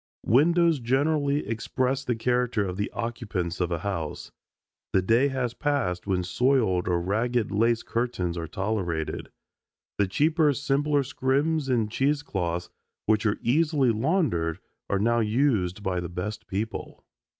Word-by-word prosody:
Windows 165 +5 +4
generally 140 +4 +1
express 130 +4 -1
the 125 -3 -1
character 120 -2 +1
of 90 -1 -4
the 105 +2 -2
occupants 105 -7 -3
of 90 0 0
a 85 - 0
house. 85 -7 -4 0.6
The 95 - +3
day 115 +8 +4
has 130 -3 -2
passed 125 - -1
when 95 -2 +1
soiled 110 -3 +2
or 90 -1 +2
ragged 110 +5 0
lace 115 +3 +2
curtains 115 -8 -2
are 85 -2 -4
tolerated. 90 -4 -2 0.7
The 100 - +3
cheaper 155 - +3
simpler 145 +1 +1
scrims 140 +3 0
and 115 -4 +1
cheese 145 +4 +1
cloths 90 -7 -3 0.3
which 110 0 +2
are 105 - +1
easily 145 -1 +3
laundered 110 - 0 0.3
are 100 - +2
now 115 +4 +2
used 105 -5 +1
by 95 -3 0
the 85 -1 -4
best 105 +6 -5
people. 105 +4 -5
115 Hz, 140 wpm, -26 LUFS, 95-135 Hz, 0.7 s, Windows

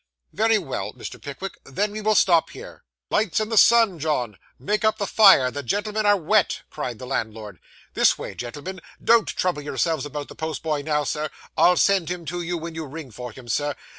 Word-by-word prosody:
'Very 225 +2 +3
well,' 160 -10 -4
said - - -27
Mr. - - -8
Pickwick, 175 +7 -7
'then 200 +10 -2
we 215 +1 -5
will 215 0 +2
stop 170 -4 +4
here.' - - -11 0.3
'Lights 210 -3 +1
in 215 0 -2
the 225 - -1
Sun, 225 -6 +5
John; 135 -8 -1 0.2
make 210 +2 -1
up 215 0 +2
the 200 - -2
fire; 190 -12 +6
the 145 - -5
gentlemen 210 - -1
are 205 0 +5
wet!' 190 +3 +1
cried 120 -3 -5
the 125 - -8
landlord. 110 -6 -4 0.3
'This - - +4
way, - - -6
gentlemen; 150 +10 -7 0.2
don't 230 -2 +4
trouble 180 -5 -1
yourselves 160 +2 -1
about 145 0 -6
the - - -11
postboy 155 -1 -3
now, 150 0 0
sir. 150 +2 -2 0.3
I'll 180 - +5
send 195 -5 +3
him 175 -1 -5
to 175 +2 -4
you 175 +1 -3
when 165 0 -6
you 160 -1 -6
ring 145 -2 -9
for 125 +2 -8
him, 125 -1 -13
sir. 145 +5 -1
165 Hz, 205 wpm, -23 LUFS, 145-205 Hz, 0.3 s, fire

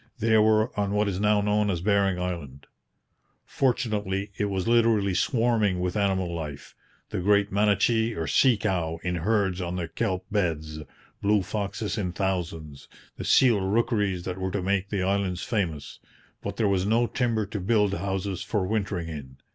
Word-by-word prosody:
They 110 -1 +2
were 110 +2 +3
on 100 0 0
what 105 0 +2
is 95 -2 -2
now 105 0 +3
known 105 0 +1
as 90 -4 -1
Bering 100 -1 +1
Island. 85 -7 -5 0.8
Fortunately, 105 -6 -1
it 105 - -1
was 95 -1 -2
literally 115 -4 +3
swarming 110 -2 +1
with 90 0 -2
animal 95 -4 0
life 75 -4 -6 0.4
the - - -2
great 100 +2 +2
manatee 105 +3 +2
or 80 - -2
sea 125 +4 +4
cow 85 -6 -1
in 90 0 -1
herds 95 0 0
on 90 0 -3
the 85 -2 -3
kelp 95 +2 -2
beds, 80 -6 -1 0.4
blue 105 -1 +2
foxes 105 +2 -3
in 90 -3 -2
thousands, 85 -6 -3 0.3
the - - -5
seal 120 -6 +4
rookeries 100 -2 0
that 90 0 -5
were 95 0 -2
to 95 0 -3
make 100 +1 0
the 100 -3 -1
islands 95 -2 -1
famous; 85 - -3 0.4
but - - -5
there 110 - +2
was 95 -2 +1
no 115 +4 +2
timber 115 -3 0
to 105 +1 -5
build 105 0 +2
houses 95 -1 -3
for 105 -4 -1
wintering 95 -4 -2
in. 70 -5 -8
100 Hz, 170 wpm, -26 LUFS, 90-105 Hz, 0.8 s, sea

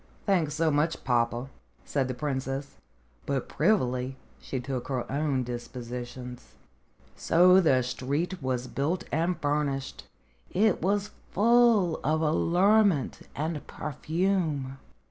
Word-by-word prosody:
"Thanks 170 -7 +1
so 160 0 +2
much, 150 +3 0
papa," 120 0 0 0.4
said 135 -3 0
the 130 - -4
princess. 135 0 -3 0.5
But, 135 -2 -1
privily, 130 - +1 0.2
she 130 - -4
took 125 0 -4
her 130 -3 -2
own 140 -2 0
dispositions. 125 0 -7 0.6
So 180 +3 +5
the 130 -7 +3
street 145 +8 -2
was 130 -1 -1
built 145 +7 -2
and 170 +2 0
furnished. 145 -2 -2 0.4
It 210 0 +2
was 200 +3 0 0.2
full 225 -5 +4
of 155 +2 +1
allurement 180 - +2
and 155 +1 -3
perfume. 155 -3 -2
145 Hz, 110 wpm, -28 LUFS, 130-175 Hz, 0.6 s, So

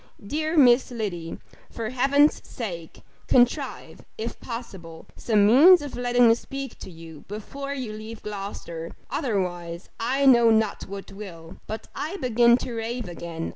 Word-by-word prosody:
Dear 310 +7 -2
Miss 250 -3 +6
Liddy! 190 -9 -4 0.3
for 225 0 -5
Heaven's 275 +4 +3
sake, 175 - -7 0.2
contrive, 245 -1 +1
if 230 +1 -5
possible, 190 -9 -8
some 210 -3 +2
means 290 - +7
of 290 - -6
letting 245 0 +3
me 225 - +7
speak 270 +2 -7
to - - -9
you 165 -3 -12
before 275 +7 -6
you 250 -6 -5
leave 215 +1 -9
Gloucester; 195 -5 -6 0.2
otherwise, 180 - -3
I 265 +4 0
know 235 -3 +7
not 220 -2 +1
what 195 0 -8
will 180 -4 -10
But 220 +1 -6
I 330 +7 -4
begin 240 - +4
to 250 - -6
rave 230 0 -4
again. 170 -1 -6
225 Hz, 145 wpm, -25 LUFS, 190-255 Hz, 0.3 s, means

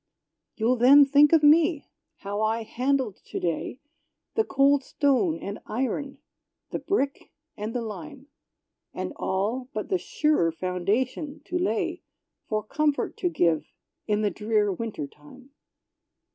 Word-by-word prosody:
You'll 235 +3 +1
then 275 +4 +8
think 285 +1 +5
of 325 -2 +5
me; 310 +1 +5 0.4
how 205 +1 -3
I 220 +1 0
handled 255 -1 -1
to - - -5
day 175 - -3 0.5
The 445 - +2
cold 275 -4 +3
stone 295 +5 +1
and 200 +1 -6
iron 265 +4 -2 0.5
the - - -2
brick 280 -8 -2 0.2
and 215 +3 -5
the 240 - -1
lime: 270 +5 -8 0.7
And - - -4
all, 225 +7 -2
but 215 - -3
the 375 -2 +1
surer 300 - +1
foundation 210 - -2
to 355 - -2
lay 335 +5 -1 0.5
For 215 -1 -1
comfort 295 +6 0
to 355 - 0
give 165 - +1 0.4
in 210 0 +1
the 205 - +1
drear 210 -2 +1
winter 215 -6 -4
time. 150 - -16
255 Hz, 135 wpm, -26 LUFS, 210-290 Hz, 0.7 s, then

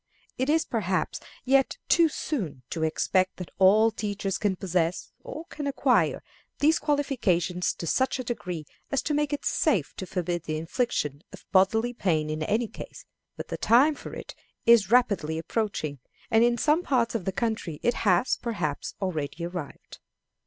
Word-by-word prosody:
It 260 +2 0
is, 320 +1 +3
perhaps, 190 -5 -1 0.3
yet 270 +1 +3
too 335 -2 +5
soon 190 - -4
to 165 - -3
expect 185 +4 +1
that 180 - -7
all 215 +4 +6
teachers 205 -3 -3
can 205 -3 +1
possess, 180 -2 -1
or - - -8
can 295 -3 -6
acquire, 280 - +2 0.3
these 310 +3 +3
qualifications 225 - 0
to - - -6
such 260 - +1
a 255 - -4
degree 180 -10 -4 0.2
as 275 -2 0
to 300 - -1
make 295 0 +1
it 290 - -3
safe 205 - +1
to 190 - -5
forbid 175 -2 -2
the 155 0 -2
infliction 160 - -2
of - - -12
bodily 220 +6 +3
pain 160 -9 0
in 155 0 -3
any 215 +8 0
case, - - -10 0.3
but - - -7
the - - -3
time 265 +7 +5
for - - -9
it - - -8 0.3
is 230 -5 +6
rapidly 200 -10 +2
approaching, 165 - -2 0.3
and 225 +1 +5
in 240 0 +3
some 305 +6 +3
parts 250 -9 +1
of 220 -6 -3
the 190 - 0
country 215 -7 -2
it 240 - +3
has, 190 +3 +3
perhaps, 175 -12 -3
already 170 -2 -3
arrived. 175 -4 -7
205 Hz, 165 wpm, -27 LUFS, 175-250 Hz, 0.3 s, all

